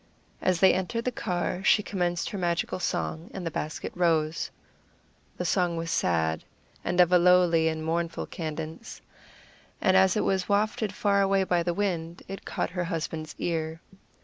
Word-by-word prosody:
As 185 Hz, -2 st, +1 dB
they 190 Hz, -, +7 dB
entered 190 Hz, +6 st, -2 dB
the 250 Hz, -, +1 dB
car 180 Hz, -3 st, -2 dB
she 210 Hz, -, +4 dB
commenced 175 Hz, -4 st, -1 dB
her 205 Hz, -, -4 dB
magical 175 Hz, 0 st, -1 dB
song, 165 Hz, -1 st, -2 dB
and 190 Hz, -2 st, -5 dB
the 165 Hz, -, -2 dB
basket 150 Hz, +1 st, -4 dB
rose. 165 Hz, -3 st, +1 dB, 0.9 s
The 180 Hz, -, -3 dB
song 175 Hz, 0 st, +1 dB
was 165 Hz, 0 st, -3 dB
sad, 80 Hz, -, +1 dB, 0.4 s
and 175 Hz, -, -1 dB
of 180 Hz, -1 st, +6 dB
a 180 Hz, -, +6 dB
lowly 175 Hz, -2 st, +5 dB
and 160 Hz, 0 st, -2 dB
mournful 165 Hz, +1 st, -1 dB
cadence, 160 Hz, +4 st, -6 dB, 0.8 s
and 185 Hz, -, +3 dB
as 190 Hz, +1 st, +5 dB
it -, -, +1 dB
was 190 Hz, 0 st, 0 dB
wafted 210 Hz, 0 st, +1 dB
far 200 Hz, 0 st, +2 dB
away 195 Hz, 0 st, +3 dB
by 180 Hz, -2 st, +1 dB
the 170 Hz, 0 st, -1 dB
wind, 170 Hz, -4 st, -2 dB
it 195 Hz, 0 st, -7 dB
caught -, -, -2 dB
her 180 Hz, -1 st, -2 dB
husband's 160 Hz, -2 st, -4 dB
ear. 160 Hz, -1 st, -2 dB
175 Hz, 170 wpm, -27 LUFS, 165-190 Hz, 0.9 s, they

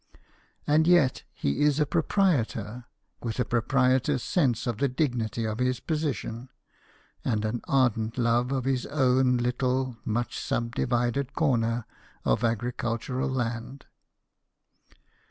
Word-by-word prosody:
And 155 Hz, +2 st, +3 dB
yet, 175 Hz, -7 st, +4 dB
he 70 Hz, -, -2 dB
is 150 Hz, 0 st, +3 dB
a 150 Hz, -, +3 dB
proprietor, 135 Hz, -, 0 dB, 0.4 s
with 115 Hz, +1 st, -4 dB
a 125 Hz, -, +2 dB
proprietor's 130 Hz, +2 st, +2 dB
sense 130 Hz, -, +1 dB
of 115 Hz, -3 st, -2 dB
the 140 Hz, -, +3 dB
dignity 120 Hz, -5 st, -1 dB
of 110 Hz, +1 st, -3 dB
his 125 Hz, 0 st, +1 dB
position, 135 Hz, -6 st, -3 dB, 0.7 s
and 110 Hz, -4 st, 0 dB
an 115 Hz, +2 st, -2 dB
ardent 115 Hz, -4 st, +1 dB
love 120 Hz, +1 st, +2 dB
of 130 Hz, -2 st, -1 dB
his 130 Hz, -2 st, 0 dB
own 130 Hz, -3 st, +3 dB
little 125 Hz, 0 st, 0 dB
much 120 Hz, +2 st, -2 dB
subdivided 120 Hz, +3 st, -1 dB
corner 120 Hz, -6 st, +1 dB, 0.4 s
of -, -, +2 dB
agricultural 120 Hz, +3 st, -1 dB
land. 120 Hz, +1 st, -3 dB
125 Hz, 120 wpm, -27 LUFS, 115-135 Hz, 0.7 s, yet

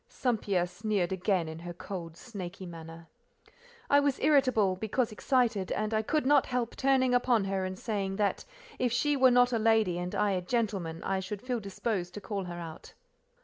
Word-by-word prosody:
St. 245 Hz, -5 st, -1 dB
Pierre 185 Hz, -4 st, +1 dB
sneered 190 Hz, 0 st, -1 dB
again, 190 Hz, -2 st, 0 dB
in 160 Hz, 0 st, -7 dB
her 175 Hz, +1 st, -7 dB
cold 170 Hz, -3 st, -7 dB
snaky 190 Hz, -5 st, -7 dB
manner. 165 Hz, -1 st, -10 dB, 0.8 s
I 285 Hz, -, +5 dB
was 285 Hz, -2 st, +1 dB
irritable, 255 Hz, -10 st, +3 dB
because 220 Hz, +5 st, -1 dB
excited, 225 Hz, -4 st, +1 dB
and 215 Hz, +1 st, -2 dB
I 215 Hz, -, +2 dB
could 300 Hz, +6 st, 0 dB
not 285 Hz, 0 st, +4 dB
help 245 Hz, -2 st, -2 dB
turning 260 Hz, -2 st, +2 dB
upon 245 Hz, -3 st, +3 dB
her 195 Hz, -1 st, -1 dB
and 185 Hz, 0 st, -5 dB
saying, 195 Hz, -3 st, -2 dB
that 205 Hz, 0 st, 0 dB, 0.4 s
if 250 Hz, -1 st, +1 dB
she 290 Hz, +5 st, +2 dB
were 260 Hz, -1 st, +6 dB
not 245 Hz, 0 st, +4 dB
a 230 Hz, -, +2 dB
lady 220 Hz, -5 st, +3 dB
and 180 Hz, 0 st, -4 dB
I 205 Hz, -, +2 dB
a 185 Hz, -2 st, 0 dB
gentleman, 190 Hz, -6 st, -2 dB
I 195 Hz, 0 st, 0 dB
should 190 Hz, +3 st, -6 dB
feel 250 Hz, -2 st, -1 dB
disposed 195 Hz, -2 st, -3 dB
to -, -, -4 dB
call 200 Hz, -2 st, -4 dB
her 175 Hz, -1 st, -6 dB
out. 165 Hz, -1 st, -9 dB
205 Hz, 190 wpm, -30 LUFS, 180-245 Hz, 0.8 s, were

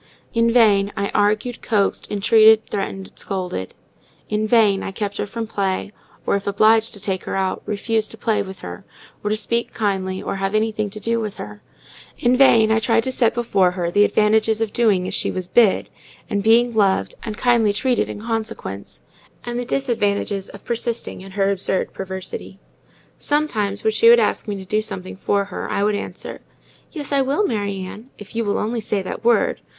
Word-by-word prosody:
In 230 Hz, 0 st, +3 dB
vain 205 Hz, -4 st, +4 dB
I 200 Hz, 0 st, -1 dB
argued, 210 Hz, +4 st, 0 dB
coaxed, 205 Hz, -3 st, 0 dB
entreated, 220 Hz, +1 st, +5 dB
threatened, 195 Hz, -1 st, -4 dB
scolded; 180 Hz, -, -4 dB, 0.5 s
in 215 Hz, 0 st, 0 dB
vain 210 Hz, -4 st, +4 dB
I -, -, -4 dB
kept 205 Hz, 0 st, -4 dB
her -, -, -1 dB
in -, -, -15 dB
from 230 Hz, +1 st, -4 dB
play, 200 Hz, -2 st, -2 dB, 0.3 s
or, -, -, +2 dB
if 200 Hz, 0 st, -3 dB
obliged 220 Hz, +3 st, +3 dB
to -, -, -8 dB
take 190 Hz, -2 st, -3 dB
her -, -, -3 dB
out, 190 Hz, -1 st, -1 dB
refused 215 Hz, +1 st, -1 dB
to 225 Hz, -, -9 dB
play 220 Hz, 0 st, 0 dB
with 190 Hz, -1 st, -8 dB
her, 90 Hz, 0 st, -8 dB, 0.4 s
or 210 Hz, -, -1 dB
to 215 Hz, -, 0 dB
speak 235 Hz, +2 st, -1 dB
kindly 190 Hz, -3 st, -1 dB
or -, -, -4 dB
have 195 Hz, +2 st, -1 dB
anything 215 Hz, -1 st, 0 dB
to 215 Hz, +2 st, -8 dB
do 230 Hz, +2 st, 0 dB
with 215 Hz, -3 st, -4 dB
her; 105 Hz, 0 st, -8 dB, 0.6 s
in 245 Hz, +1 st, +2 dB
vain 230 Hz, -5 st, +5 dB
I 220 Hz, -, +3 dB
tried 230 Hz, 0 st, +2 dB
to 260 Hz, -, -1 dB
set 240 Hz, -3 st, +2 dB
before 200 Hz, -6 st, +2 dB
her 175 Hz, -1 st, -3 dB
the 205 Hz, +3 st, +4 dB
advantages 215 Hz, +1 st, +2 dB
of 225 Hz, -2 st, -2 dB
doing 210 Hz, -6 st, +2 dB
as -, -, -4 dB
she -, -, 0 dB
was 185 Hz, -1 st, -4 dB
bid, 210 Hz, +1 st, +3 dB, 0.4 s
and 205 Hz, -3 st, -1 dB
being 235 Hz, +3 st, +4 dB
loved, 195 Hz, -, +2 dB
and 215 Hz, -2 st, -6 dB
kindly 235 Hz, -4 st, +3 dB
treated 245 Hz, +4 st, 0 dB
in 205 Hz, -, -7 dB
consequence, 220 Hz, -, -5 dB, 0.4 s
and 240 Hz, 0 st, -3 dB
the 245 Hz, -, -3 dB
disadvantages 205 Hz, -6 st, -1 dB
of 200 Hz, -, -13 dB
persisting 235 Hz, -3 st, -3 dB
in 190 Hz, 0 st, -11 dB
her 195 Hz, 0 st, +1 dB
absurd 190 Hz, -1 st, -1 dB
perversity. 190 Hz, 0 st, -6 dB, 0.6 s
Sometimes, 220 Hz, -10 st, -1 dB
when 220 Hz, -, +2 dB
she 230 Hz, +1 st, +5 dB
would 235 Hz, 0 st, +8 dB
ask 220 Hz, +1 st, 0 dB
me 205 Hz, -, -2 dB
to 190 Hz, -1 st, -8 dB
do 210 Hz, +3 st, 0 dB
something 185 Hz, -3 st, -6 dB
for 200 Hz, +1 st, 0 dB
her, 195 Hz, -, -6 dB
I 200 Hz, -, 0 dB
would 210 Hz, +1 st, +2 dB
answer,—"Yes, 290 Hz, +7 st, -8 dB
I 280 Hz, -1 st, +3 dB
will, 280 Hz, +10 st, +1 dB
Mary 200 Hz, -, -2 dB
Ann, 215 Hz, +7 st, -9 dB
if 205 Hz, +1 st, -12 dB
you 230 Hz, -, 0 dB
will 205 Hz, -2 st, 0 dB
only 225 Hz, +2 st, -2 dB
say 205 Hz, -2 st, -1 dB
that 190 Hz, -, -6 dB
word. 240 Hz, -, +2 dB
210 Hz, 195 wpm, -21 LUFS, 195-230 Hz, 0.6 s, would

